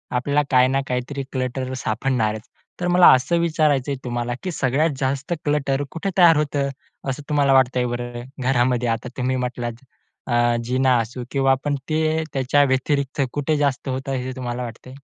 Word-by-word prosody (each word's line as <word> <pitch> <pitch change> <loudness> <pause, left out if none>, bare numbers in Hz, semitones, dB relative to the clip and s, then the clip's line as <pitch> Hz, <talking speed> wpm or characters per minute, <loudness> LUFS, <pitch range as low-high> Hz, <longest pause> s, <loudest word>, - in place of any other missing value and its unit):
आपल्याला 145 +4 +1
काय 125 0 +5
ना 135 +1 +1
काहीतरी 130 +3 -3
क्लटर 130 0 -3
सापडणारच. 110 -2 -1 0.3
तर 180 - -1
मला 180 0 +6
असं 130 +7 +2
विचारायचंय 150 -5 +1
तुम्हाला, 120 0 -2
की 185 - -2
सगळ्यात 145 +3 +1
जास्त 135 +5 -1
क्लटर 145 -1 0
कुठे 185 +4 -3
तयार 170 -3 +7
होतं? 145 -2 0 0.4
असं 140 +2 -4
तुम्हाला 140 -2 +3
वाटतंय 125 -1 +3
बरं? 120 0 -4 0.2
घरामध्ये 125 -1 +1
आता 115 +2 -2
तुम्ही 130 +1 0
म्हटलात, 125 -1 -4 0.4
अ, 120 -1 +2
जिना 130 +1 +2
असू 120 +2 -4
किंवा 135 -1 +2
आपण 140 +2 0
ते, 160 0 +1
त्याच्या 135 +2 +3
व्यतिरिक्त 140 +1 0
कुठे 145 +1 0
जास्त 140 -2 0
होत 135 +1 -4
आहे? 130 -2 -2
हे 130 - -4
तुम्हाला 125 -1 -4
वाटतंय? 120 +2 -9
130 Hz, 165 wpm, -22 LUFS, 125-145 Hz, 0.4 s, तयार